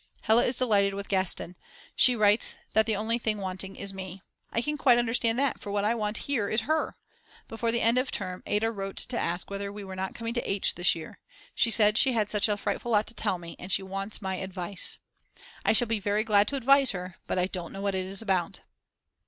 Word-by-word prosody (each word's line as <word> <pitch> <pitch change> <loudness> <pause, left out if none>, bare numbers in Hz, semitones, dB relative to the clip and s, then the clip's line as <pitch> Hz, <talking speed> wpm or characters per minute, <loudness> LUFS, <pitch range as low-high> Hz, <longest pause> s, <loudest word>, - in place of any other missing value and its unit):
Hella 225 +2 +4
is 245 - 0
delighted 200 -5 +2
with 200 0 -5
Gastein, 185 -2 0 0.4
she 250 - +6
writes 210 0 +3 0.2
that 220 0 +3
the 220 - +1
only 225 +3 -1
thing 220 -2 0
wanting 190 0 -4
is 200 -1 -5
me. 190 0 -8 0.3
I - - 0
can 300 +2 -1
quite 260 -4 +4
understand 235 -1 +1
that, 275 0 0
for 200 - -7
what 205 0 0
I 220 - +2
want 210 -2 -1
here 240 -8 -1
is 220 - +2
her. 310 +7 -1 0.5
Before 230 +1 -2
the 235 - 0
end 235 +2 +3
of 255 - -2
term 185 -2 -4
Ada 220 +2 +1
wrote 195 -3 -6
to 245 -2 -1
ask 175 +3 -3
whether 200 0 -4
we 205 0 -8
were 190 -1 -8
not 190 0 -4
coming 230 0 -4
to 240 - -3
H. 195 0 0
this 175 0 +2
year; 160 -1 -9 0.3
she 235 - +2
said 215 0 +4
she 265 -2 +4
had 215 -3 0
such 210 0 +3
a 205 - +1
frightful 235 +3 -2
lot 210 0 +3
to - - -7
tell 190 - 0
me, 170 -1 -9
and 185 - -8
she 195 - +3
wants 195 +2 -4
my 190 -1 -2
advice. 190 0 -2 0.7
I - - +4
shall 235 +2 +6
be 225 -1 0
very 205 +1 0
glad 210 -2 +3
to 280 - -2
advise 275 +1 +4
her, 180 -1 -7
but - - -2
I 180 - +3
don't 180 -3 -6
know 195 0 -7
what 200 -1 0
it 185 -1 -2
is 195 +3 -2
about. 185 -5 -1
205 Hz, 235 wpm, -28 LUFS, 190-230 Hz, 0.7 s, she